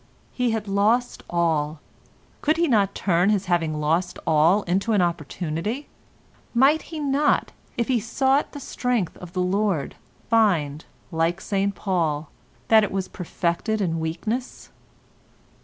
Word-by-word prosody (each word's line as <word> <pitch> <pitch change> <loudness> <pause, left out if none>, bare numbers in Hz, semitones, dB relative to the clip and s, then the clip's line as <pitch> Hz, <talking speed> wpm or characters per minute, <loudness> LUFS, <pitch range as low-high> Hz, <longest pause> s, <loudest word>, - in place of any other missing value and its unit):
He 250 -1 0
had 220 -2 -2
lost 215 +5 +1
all. 160 -3 0 0.6
Could 310 +2 +2
he 340 0 +2
not 205 -7 +2
turn 180 0 +2
his 200 -2 +1
having 165 -4 0
lost 165 +4 0
all 165 +6 +4
into 195 +6 0
an 205 - +3
opportunity? 175 - -3 0.7
Might 275 +6 +5
he 320 - -6
not, 290 0 +1 0.3
if 235 - 0
he 255 - +2
too - - -2
sought 270 +4 +1
the 290 - -6
strength 245 - -1
of 180 -1 -11
the 185 -1 0
Lord, 190 -5 0 0.3
find, 170 -10 +2 0.3
like 165 +3 0
St 200 0 -1
Paul, 160 -6 -1 0.4
that 220 -1 +6
it 210 - -1
was 190 -1 -2
perfected 180 +4 -2
in 165 -5 0
weakness? 215 +11 -4
195 Hz, 140 wpm, -24 LUFS, 170-230 Hz, 0.7 s, that